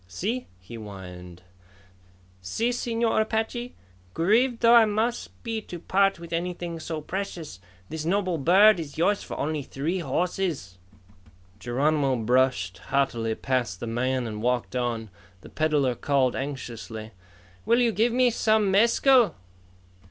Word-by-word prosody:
"See?" 215 - -3
he 95 +5 -14
whined. 90 -4 -10 1.0
"See, 220 - -1
Señor 235 -2 0
Apache? 225 +3 -2 0.4
Grieved 230 +8 +2
though 235 0 +6
I 235 -2 +8
must 220 +3 -1
be 225 -2 -3
to 180 - -8
part 195 +3 +2
with 170 0 -9
anything 175 -1 -3
so 160 -1 -5
precious, 170 - -5 0.3
this 160 -1 -5
noble 185 -1 0
bird 190 +7 +6
is 155 -3 -7
yours 200 +5 +2
for - - -7
only 155 0 -2
three 150 +7 -3
horses." 165 - -2 0.8
Geronimo 135 +3 +1
brushed 120 -5 +1
haughtily 120 -5 -1
past 125 -8 -2
the - - -5
man 125 +2 -1
and 105 -2 -5
walked 125 +1 -1
on. 115 -4 -2 0.3
The - - -13
peddler 150 -5 +1
called 130 +1 +1
anxiously, 115 -5 -6 0.5
"Will 235 +1 +3
you 240 -2 +3
give 225 +3 +2
me 250 0 +3
some 215 -3 +2
mescal?" 235 +4 +4
160 Hz, 135 wpm, -26 LUFS, -, 1.0 s, I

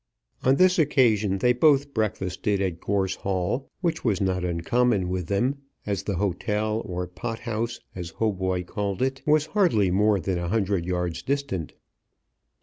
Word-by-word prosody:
On 130 +1 +4
this 185 +2 +4
occasion 110 -10 +3
they 125 +5 +3
both 140 +1 +3
breakfasted 100 -2 -1
at 90 -4 -1
Gorse 95 -2 0
Hall, 95 +7 -2
which 170 -3 -1
was 105 -5 +1
not 95 -2 0
uncommon 90 +4 +1
with 90 -2 -2
them, 125 - 0 0.3
as 100 -2 -1
the 100 - -3
hotel, 105 +4 -1
or 90 -1 -3
pot 100 +5 -6
house, 115 +1 -3 0.2
as 85 -3 -6
Hautboy 95 -4 -1
called 100 +3 -2
it, 135 0 -1
was 150 0 +4
hardly 135 - +3
more 105 +2 +3
than 90 -1 -1
a 85 - -3
hundred 100 -3 0
yards 90 -2 -2
distant. 140 - -2
100 Hz, 155 wpm, -25 LUFS, 90-125 Hz, 0.3 s, On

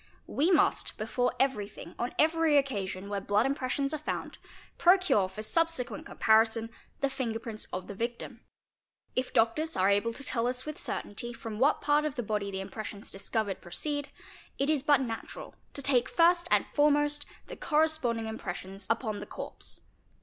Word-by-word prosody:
We 310 +5 +1
must, 365 - +2
before 245 +4 0
every 260 -7 +1
thing, 180 -4 -11
on 240 +1 -2
every 320 -1 +4
occasion 200 -8 -1
where 200 -1 -2
blood 205 +3 +2
impressions 275 +1 -1
are 310 - -2
found, 305 - -4 0.4
procure 355 - +4
for 210 +3 -6
subsequent 315 +3 0
comparison 225 +1 +3 0.3
the 275 - +3
finger 250 -4 -2
prints 225 -1 -5
of 185 0 -4
the - - -7
victim. 235 +4 -4 0.7
If 255 0 0
doctors 270 +9 +2
are 190 +2 +4
able 205 +3 +2
to 275 - -6
tell 240 -3 0
us 250 +1 -1
with 305 0 -5
certainty 240 +4 -4
from 225 -2 -7
what 280 +4 +3
part 295 +1 +3
of 305 -2 -2
the 245 - -2
body 210 -1 -1
the 190 -1 -4
impressions 200 +1 -7
discovered 200 0 -2
proceed, 290 - -3 0.5
it 275 +3 +2
is 300 -3 +1
but 290 -1 +4
natural 230 -3 -6 0.2
to 280 - -2
take 255 -3 +4
first 345 +1 +4
and - - +4
foremost 295 0 +2 0.2
the - - -8
corres 315 0 +2
ponding 230 -4 -1
impressions 195 -2 -6
upon 225 -2 0
the - - -7
corpse. - - -4
245 Hz, 170 wpm, -30 LUFS, 215-290 Hz, 0.7 s, every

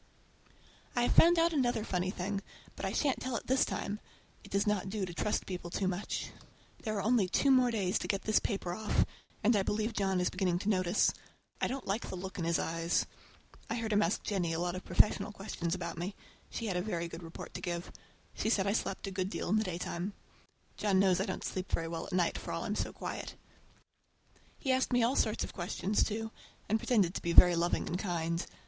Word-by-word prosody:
I 240 - +3
have - - +2
found 340 +1 +7
out 335 0 +4
another 245 -6 +1
funny 185 -3 -1
thing, 195 +1 -2 0.3
but - - -4
I - - -2
shan't 280 -4 +1
tell 255 -1 -2
it - - -3
this 260 +1 +3
time! 205 +1 -3 0.4
It - - -12
does 200 +1 +1
not 205 -2 0
do 200 -1 -1
to 175 - -7
trust 210 +4 0
people 180 -2 -5
too 190 +2 -1
much. 185 +2 -2 0.5
There 215 -2 -2
are 200 - -1
only 220 -3 +3
two 275 +8 +3
more 255 -2 +6
days 200 -5 +1
to - - -4
get 195 -1 -1
this 215 - +4
paper 195 -5 -2
off, 215 +2 +1 0.4
and 225 +2 +5
I 200 - +4
believe 215 +3 -1
John 195 -3 +1
is 180 - +1
beginning 185 -2 +1
to 200 +3 -2
notice. 185 -1 +3 0.5
I - - +3
don't 270 0 -4
like 200 +4 -2
the - - -4
look 190 +1 -6
in 170 - -1
his 170 0 +2
eyes. 165 +1 0 0.6
And 230 - -1
I - - -2
heard 220 -1 -1
him 205 - +4
ask 185 +1 +1
Jennie 180 -5 0
a 165 - -1
lot 175 0 0
of 185 - -5
professional 205 0 +3
questions 185 -4 -3
about 170 -2 -5
me. 185 +4 -3 0.3
She 230 - -4
had 190 -4 0
a - - +1
very 175 -4 -2
good 165 +1 -8
report 165 -1 -9
to - - -5
give. 175 -1 -3 0.4
She 220 - -1
said 195 -4 +3
I 200 - +2
slept 195 -3 -2
a 195 - -4
good 185 0 -1
deal - - -3
in 215 - +4
the 215 - +2
daytime. 180 +1 -3 0.6
John 200 -2 +2
knows 190 -1 +4
I 195 - -1
don't - - -3
sleep 185 0 -4
very 165 - 0
well 165 0 -4
at - - -9
night, 180 -2 +1
for - - -6
all - - -2
I'm - - -1
so - - -2
quiet! - - -5 1.2
He 265 - 0
asked 260 0 +2
me 245 -1 +4
all 245 +4 +2
sorts 215 - +2
of - - -6
questions, 185 +3 0
too, 225 +1 -3 0.4
and 220 +2 +2
pretended 205 -7 +2
to - - -4
be 170 - -1
very 175 +1 +9
loving 170 +1 +1
and 180 - -2
kind. 170 -3 -1
195 Hz, 230 wpm, -32 LUFS, 175-220 Hz, 1.2 s, very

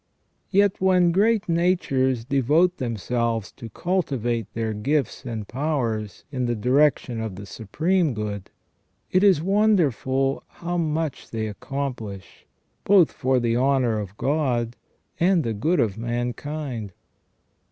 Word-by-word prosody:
Yet 200 -1 +2
when 180 -2 +4
great 210 +4 +2
natures 140 -8 +1
devote 150 +7 +2
themselves 115 -1 -2
to 115 - -10
cultivate 120 - -1
their 110 -1 -1
gifts 135 +5 -1
and 110 -4 -5
powers 120 - -2
in 125 -3 -1
the 120 - 0
direction 125 0 +2
of 110 -4 -4
the 100 +2 -8
Supreme 155 - 0
Good, 105 -2 -4 0.6
it 185 +1 +3
is 190 -7 +5
wonderful 155 - +2
how 175 +1 -4
much 160 -2 -2
they 110 -1 -3
accomplish, 115 -4 -6 0.4
both 190 -5 +5
for 130 -1 +1
the 115 -1 0
honour 125 -3 +2
of 100 0 -7
God 125 -5 0 0.4
and 175 -1 +3
the 115 - -1
good 160 - +1
of 110 -4 0
mankind. 120 -1 -4
130 Hz, 125 wpm, -24 LUFS, 115-165 Hz, 0.6 s, is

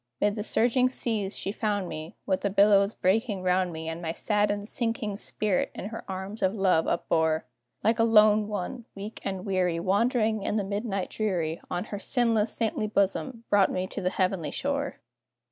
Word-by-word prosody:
'Mid 205 0 +2
the 210 - -3
surging 245 +4 +2
seas 220 -6 -1
she 195 - -2
found 205 -3 -1
me, 155 0 -7
With 190 -2 0
the 200 - 0
billows 200 +1 +4
breaking 200 0 +1
round 180 0 +2
me, 160 0 -6
And 165 +1 -4
my 165 -1 -3
saddened, 205 +1 0
sinking 225 -3 -2
spirit 210 -2 -1
in 200 - -5
her 225 - -7
arms 190 +3 -6
of 190 +3 +2
love 185 -5 +2
upbore; 160 -2 +1 0.4
Like 225 +1 +2
a - - +5
lone 215 -2 +5
one, 210 +3 -4
weak 205 +3 -7
and 190 -1 -4
weary, 180 -4 +1
Wandering 215 +3 +1
in 200 - -1
the 210 - +1
midnight 200 -1 -3
dreary, 175 -7 -1
On 175 - -2
her 205 -1 -6
sinless, 230 -2 +2
saintly 220 -1 -1
bosom, 215 +4 0
brought 200 -2 +5
me 185 0 -1
to - - -6
the 180 - +1
heavenly 185 -4 0
shore. 280 - -2
205 Hz, 180 wpm, -27 LUFS, 185-220 Hz, 0.4 s, a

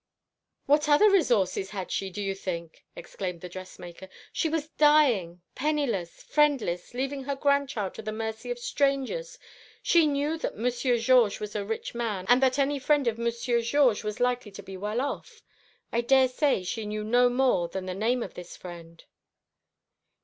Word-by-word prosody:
"What 300 +1 +3
other 405 +9 +6
resources 205 - +2
had 190 -3 -6
she, 195 - -2
do 205 +2 -5
you 195 0 -1
think?" 170 -4 -6
exclaimed 180 -4 -6
the 180 - -7
dressmaker. 185 0 -10 0.2
"She 320 - 0
was 310 -1 -2
dying, 250 - +3
penniless, 260 - -2
friendless, 260 - +1
leaving 270 +1 -3
her 280 0 -2
grandchild 280 -7 0
to - - -8
the 215 0 -4
mercy 220 - -5
of - - -2
strangers. 480 - -1 0.5
She 335 -3 +4
knew 295 +3 -1
that - - -4
Monsieur 245 +2 +1
Georges 235 -3 +4
was 210 0 -6
a 205 - -1
rich 220 +2 -4
man, 220 -6 -3
and 245 +2 +6
that 260 0 +3
any 280 0 +1
friend 285 0 +2
of 230 0 0
Monsieur 235 +1 0
Georges 240 -2 +2
was 210 -1 -4
likely 245 -2 0
to 200 - -9
be 190 0 -9
well 210 +5 -2
off. 280 0 -5 0.5
I 235 - +1
daresay 260 -2 +3
she 210 +4 -4
knew 210 0 -3
no 245 +3 +4
more 245 -8 +2
than 185 +2 -5
the 185 - -4
name 230 +5 0
of - - -8
this 180 -1 -10
friend." 170 -2 -11
235 Hz, 170 wpm, -27 LUFS, 195-280 Hz, 0.5 s, other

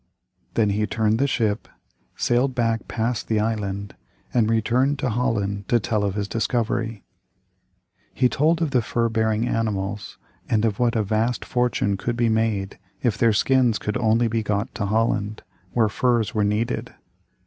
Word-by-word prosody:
Then 105 -3 +3
he 105 +1 0
turned 110 0 +1
the 140 - +3
ship, 110 -6 0 0.5
sailed 125 +2 +1
back 115 -2 0
past 115 0 -2
the 110 -1 +1
island, 100 -2 -2 0.4
and 115 -3 +3
returned 120 +5 +2
to 130 -3 -1
Holland 100 -4 -1
to 120 - +4
tell 110 -1 -1
of 100 -1 -1
his 100 -1 -2
discovery. 115 -1 -1 1.1
He 125 - +2
told 160 +7 +2
of 155 - -1
the 125 -3 +3
fur 115 +1 0
bearing 110 0 +1
animals, 105 -3 -2 0.3
and 110 0 +2
of 105 -2 -1
what 120 -1 +2
a 110 - +2
vast 110 +4 0
fortune 120 -5 0
could 120 +4 -3
be 120 -1 +2
made 110 -4 0 0.2
if 120 -5 +2
their 115 +1 +3
skins 125 +1 +3
could 105 - -3
only 115 0 +2
be 115 0 0
got 105 0 -2
to 100 -3 -2
Holland, 110 0 0 0.3
where 115 -3 +3
furs 120 +1 +1
were 105 -2 +1
needed. 105 +3 -1
110 Hz, 165 wpm, -23 LUFS, 105-120 Hz, 1.1 s, to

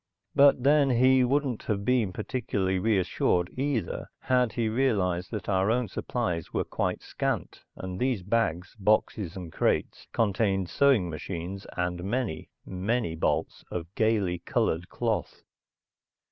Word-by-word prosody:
But 140 -3 +5
then 145 0 +5
he 130 +1 +5
wouldn't 135 -2 0
have 100 -2 -1
been 120 -6 +2
particularly 100 -4 -1
reassured, 90 -3 +1
either, 135 -3 -2
had 125 -3 +2
he 115 -1 0
realized 100 -7 +1
that 105 -4 -5
our 95 0 +2
own 120 0 +1
supplies 90 -10 -3
were - - 0
quite - - -2
scant - - -3
and 95 0 -6
these 125 -7 0
bags, 95 -4 -1
boxes, 105 -2 +1
and 85 -3 -8
crates - - 0
contained 100 -4 +1
sewing 135 -10 +4
machines 85 +3 -6
and 90 0 -2
many, 100 -5 -2 0.2
many 95 +1 -1
bolts 80 - -1
of 85 +1 -5
gaily 105 -6 +1
colored 85 +1 -1
cloth. - - -2
105 Hz, 130 wpm, -28 LUFS, 90-125 Hz, 0.2 s, But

